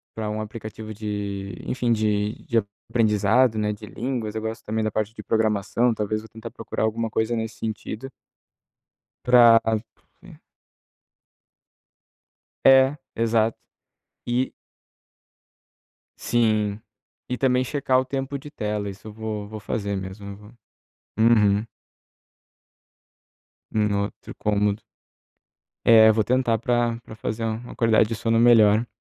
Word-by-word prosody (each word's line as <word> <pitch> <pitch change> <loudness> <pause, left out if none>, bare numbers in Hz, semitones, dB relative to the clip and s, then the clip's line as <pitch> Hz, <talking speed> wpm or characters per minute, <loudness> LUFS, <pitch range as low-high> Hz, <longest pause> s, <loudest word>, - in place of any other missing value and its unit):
pra 110 -1 -3
um 105 0 -3
aplicativo 110 0 -7
de, 100 -2 -4
enfim, 125 -2 -1
de 105 -1 +1
de 115 - +1 0.3
aprendizado, 110 +1 +3
né, 105 0 0
de 105 +1 -10
línguas. 115 -1 -4
Eu 110 - -2
gosto 110 0 -5
também 110 +1 -2
da 110 - -1
parte 110 +1 -2
de - - -8
programação, 110 +2 +1
talvez 110 0 -2
vou 110 - -13
tentar 115 +1 -9
procurar 115 -1 -4
alguma 110 +1 -1
coisa 110 +2 0
nesse 110 -1 -4
sentido 110 +3 -5 1.2
pra 120 -2 +7 0.6
e - - -14 2.3
É, 135 +1 +6 0.2
exato. 115 -1 +1 0.7
E 125 +2 0 1.7
Sim, 110 -3 +1 0.5
e 125 - -3
também 125 -1 +2
checar 130 -1 +1
o - - -3
tempo 135 +1 -3
de 150 - -10
tela. 105 -6 -3
Isso 100 +2 -13
eu 110 - -7
vou 110 -1 -5
vou 110 0 -8
fazer 100 -1 -3
mesmo. 95 +2 -7
Eu 100 - -8
vou 105 +2 -15 0.6
uhum. 105 -2 +4 2.1
No 105 -2 +1
outro - - -9
cômodo. 105 0 0 1.0
É, 110 -1 +8
eu 110 - +5
vou 110 -1 +2
tentar 125 -2 +1
pra 120 0 0
pra - - -10
fazer 110 +1 -4
uma 115 +2 -4
qualidade 110 -2 +3
de 115 - -2
sono 115 +1 0
melhor. 115 -1 +5
110 Hz, 130 wpm, -24 LUFS, 105-120 Hz, 2.3 s, É